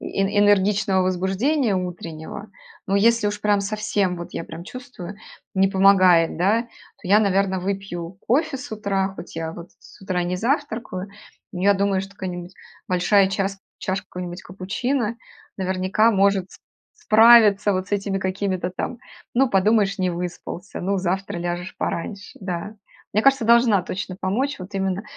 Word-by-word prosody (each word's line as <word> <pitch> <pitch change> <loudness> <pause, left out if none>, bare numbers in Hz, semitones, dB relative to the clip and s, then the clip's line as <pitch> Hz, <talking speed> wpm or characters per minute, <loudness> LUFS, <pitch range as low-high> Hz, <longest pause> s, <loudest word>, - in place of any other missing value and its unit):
э - - -7
энергичного 200 -1 +3
возбуждения 195 - +1
утреннего. 175 +2 -6 0.4
Но 195 - 0
если 230 +1 +3
уж 205 0 -2
прям 205 -1 +2
совсем, 205 -2 -1
вот 170 0 -7
я 165 - -4
прям 165 +1 -9
чувствую, 205 -6 -9 0.4
не 195 0 +4
помогает, 185 -4 +5
да, 205 +6 +3
то 230 -5 -15
я, 205 +2 +6
наверно, 195 -2 +1
выпью 185 -2 -4
кофе 280 +3 +2
с 255 - -9
утра, 200 -3 -1
хоть 170 -1 -10
я, 160 0 -3
вот, 170 +1 -10
с - - -17
утра 185 -2 -1
не 180 +1 -2
завтракаю. 225 - -2 0.4
Но 180 -1 -5
я 200 0 +5
думаю, 195 -1 +1
что 195 +1 -8
какая-нибудь 180 -2 -6 0.4
большая 190 +2 +3
час 195 0 -2 0.2
чашка 190 +1 -3
какого-нибудь 180 0 -7
капучино, 215 +6 -2 0.4
наверняка, 190 +4 +2
может 195 -1 +2
с - - -14 0.4
справиться 215 -7 +6
вот 185 0 -2
с - - -12
этими 200 -1 0
какими-то 190 -1 -2
там: 230 +6 -4 0.4
"Ну, 260 +1 +3
подумаешь, 200 0 +2
не 185 -1 +1
выспался, 175 +2 -6
ну, 195 +2 0
завтра 190 0 -2
ляжешь 175 +1 -4
пораньше", 200 +4 -4
да. 190 +3 -5 0.4
Мне 215 - +2
кажется, 270 -2 +4
должна 235 -4 +5
точно 185 +1 -5
помочь, 255 +10 -1
вот 185 +3 -9
именно, 195 0 -1
195 Hz, 155 wpm, -22 LUFS, 185-210 Hz, 0.4 s, я